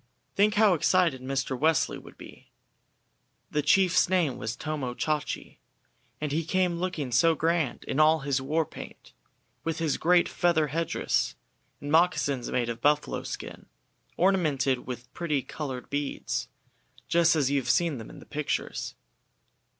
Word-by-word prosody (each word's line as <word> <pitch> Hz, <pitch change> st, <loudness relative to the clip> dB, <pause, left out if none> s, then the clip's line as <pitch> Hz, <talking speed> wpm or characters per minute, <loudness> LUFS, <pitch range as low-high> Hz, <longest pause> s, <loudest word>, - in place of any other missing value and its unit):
Think 205 Hz, +1 st, +3 dB
how 210 Hz, -2 st, +5 dB
excited 170 Hz, -4 st, +2 dB
Mr. 135 Hz, 0 st, -2 dB
Wesley 155 Hz, +3 st, +1 dB
would -, -, -15 dB
be! -, -, -14 dB, 1.0 s
The 150 Hz, -, +1 dB
chief's 180 Hz, +4 st, +4 dB
name 175 Hz, -8 st, +1 dB
was 110 Hz, +1 st, -3 dB
Tomo 145 Hz, -6 st, -4 dB
Chachi, 150 Hz, +1 st, -3 dB, 0.6 s
and 150 Hz, -1 st, -3 dB
he 160 Hz, +3 st, 0 dB
came 180 Hz, 0 st, 0 dB
looking 170 Hz, -8 st, -3 dB
so 165 Hz, +7 st, +4 dB
grand 160 Hz, -2 st, 0 dB
in 140 Hz, -, -3 dB
all 155 Hz, 0 st, +5 dB
his 135 Hz, -1 st, 0 dB
war 155 Hz, +4 st, 0 dB
paint, -, -, -11 dB, 0.5 s
with 165 Hz, 0 st, -2 dB
his 160 Hz, -3 st, 0 dB
great 175 Hz, +1 st, +4 dB
feather 160 Hz, -4 st, +1 dB
head 165 Hz, +4 st, -1 dB
dress, -, -, 0 dB, 0.4 s
and 145 Hz, -, -6 dB
moccasins 150 Hz, -6 st, +2 dB
made 120 Hz, -2 st, 0 dB
of 115 Hz, 0 st, -5 dB
buffalo 150 Hz, +1 st, +1 dB
skin, -, -, -7 dB, 0.5 s
ornamented 150 Hz, -10 st, +1 dB
with 125 Hz, -1 st, -7 dB
pretty 150 Hz, -6 st, -1 dB
coloured 135 Hz, -5 st, -6 dB
beads, 145 Hz, 0 st, -2 dB, 0.6 s
just 170 Hz, 0 st, +4 dB
as 140 Hz, -3 st, +1 dB
you 140 Hz, -, +3 dB
have -, -, -6 dB
seen 165 Hz, -7 st, +2 dB
them 110 Hz, -, -9 dB
in -, -, -12 dB
pictures. 150 Hz, -1 st, -3 dB
155 Hz, 150 wpm, -27 LUFS, 135-170 Hz, 1.0 s, how